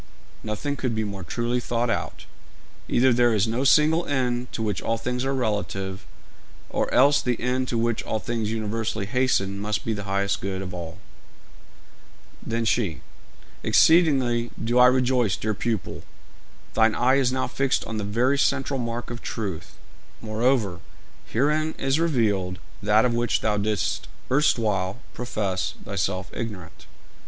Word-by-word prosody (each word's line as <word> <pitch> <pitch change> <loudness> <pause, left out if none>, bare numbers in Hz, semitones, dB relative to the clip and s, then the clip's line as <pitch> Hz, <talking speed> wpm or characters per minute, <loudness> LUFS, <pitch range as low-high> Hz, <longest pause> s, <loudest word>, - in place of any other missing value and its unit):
'Nothing 110 +7 -3
could 125 -4 -2
be 110 - 0
more 100 -3 -5
truly 120 +7 -1
thought 120 0 -1
out. - - -4 0.6
Either 130 +1 +4
there 120 -1 +3
is 105 +1 +2
no 115 +4 -1
single 155 +4 +4
end 125 -3 -1
to 110 - -3
which 105 -4 -1
all 115 - -1
things 125 +2 -2
are 135 0 0
relative, 100 -5 -2 0.6
or - - -1
else 145 +3 +5
the 125 -2 -1
end 130 +1 0
to 120 - -1
which 115 0 0
all 110 - -2
things 115 -1 -2
universally 110 -1 -2
hasten 100 -4 0
must 105 +1 -2
be 115 - 0
the 105 -1 -5
highest 100 0 -1
good 95 0 -3
of 90 -1 -7
all.' 85 -2 -6 1.5
Then 115 0 -2
she: 105 -7 0 0.6
'Exceedingly 135 -8 +4
do 120 +3 +1
I 125 - +9
rejoice, 125 -5 +2
dear 110 0 -1
pupil; 110 -2 -3 0.7
thine 110 -1 +3
eye 130 +2 +3
is 130 -2 +2
now 130 0 0
fixed 135 -1 0
on 110 - -4
the 105 - -2
very 120 +7 +1
central 135 0 +1
mark 120 0 -4
of 120 - -6
truth. 100 -8 -5 0.4
Moreover, 110 -4 0 0.5
herein 150 +6 +1
is 135 +3 +1
revealed 105 - +1 0.2
that 105 +3 +4
of 120 - +1
which 120 0 +1
thou 105 -1 +1
didst 105 -2 -1 0.2
erstwhile 110 -8 +2 0.2
profess 105 -6 -2
thyself 95 -1 -2
ignorant.' 100 -8 -7
115 Hz, 150 wpm, -25 LUFS, 105-125 Hz, 1.5 s, I